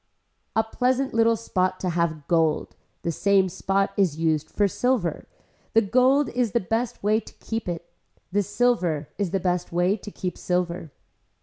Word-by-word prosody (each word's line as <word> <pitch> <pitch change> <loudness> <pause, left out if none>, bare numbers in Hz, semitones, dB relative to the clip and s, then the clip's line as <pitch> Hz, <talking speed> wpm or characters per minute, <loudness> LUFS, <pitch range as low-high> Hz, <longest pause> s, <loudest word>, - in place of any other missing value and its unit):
A 220 - +4
pleasant 255 +4 0
little 230 0 +4
spot 185 -4 -1
to 185 - 0
have 165 -3 -1
gold. 165 -3 +1 0.3
The 170 - 0
same 195 +2 +3
spot 195 +2 0
is 180 -7 +2
used 160 -2 0
for 205 - +2
silver. 205 - 0 0.5
The 225 - +5
gold 255 +7 +3
is 240 -4 -1
the 235 - +3
best 225 +4 -2
way 215 +2 +3
to - - -13
keep 225 -4 -4
it. 170 0 -5 0.4
The 205 +2 +2
silver 185 -8 0
is 200 -3 0
the 180 -1 0
way 175 +3 +2
to 210 0 -9
keep 180 -3 -5
silver. 180 -2 -1
195 Hz, 165 wpm, -25 LUFS, 175-225 Hz, 0.5 s, The